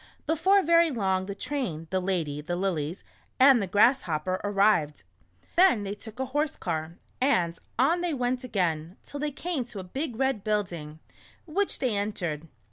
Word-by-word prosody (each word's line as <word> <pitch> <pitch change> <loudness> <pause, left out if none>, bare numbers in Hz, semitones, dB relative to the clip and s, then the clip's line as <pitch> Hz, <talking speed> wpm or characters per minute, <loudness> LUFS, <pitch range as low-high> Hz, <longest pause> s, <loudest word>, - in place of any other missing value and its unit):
Before 380 +5 +3
very 335 0 +5
long 190 -7 0
the 200 - -4
train, 220 - -3
the 190 - +1
lady, 170 -6 -2
the 175 +3 -3
lilies, 175 -3 -2 0.4
and 260 -2 +7
the 195 - -2
Grasshopper 185 - +2
arrived. 195 -7 +2 0.5
Then 355 - +5
they 200 0 -3
took 220 +3 -11
a 265 - 0
horse 295 +4 -1
car, 165 -1 -4 0.2
and 175 -11 +2 0.2
on 315 +8 +3
they 345 -4 -1
went 250 0 -1
again, 175 -6 -1
till 285 - -7
they 300 +1 -1
came 305 -1 -3
to 230 - -11
a - - -5
big 265 - -4
red 265 -4 0
building, 175 -8 -2 0.5
which 380 +5 -1
they 250 -5 0
en 205 +1 -1
tered. 165 -4 -4
205 Hz, 170 wpm, -27 LUFS, 175-270 Hz, 0.5 s, and